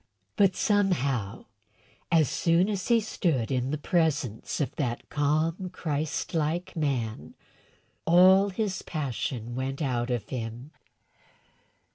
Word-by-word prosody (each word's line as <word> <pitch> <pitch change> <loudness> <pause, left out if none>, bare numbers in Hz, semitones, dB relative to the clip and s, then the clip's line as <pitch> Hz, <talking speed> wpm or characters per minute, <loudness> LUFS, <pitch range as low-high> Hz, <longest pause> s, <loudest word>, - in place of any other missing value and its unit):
But, 195 -2 +4
somehow, 140 - 0 0.7
as 160 -4 +5
soon 170 - +2
as 200 -3 -2
he 235 -1 +5
stood 160 - -1
in 130 0 0
the 150 - -1
presence 150 - -1
of 145 - -2
that 120 -5 -2
calm, 155 +5 0
Christ 155 -4 -3
like 165 +3 -1
man, 130 -9 -2 0.7
all 185 +4 +6
his 195 0 -2
passion 125 -6 -4
went 130 +2 -3
out 125 -4 -1
of 120 -4 -2
him. 120 +3 -5
150 Hz, 115 wpm, -27 LUFS, 125-180 Hz, 0.7 s, all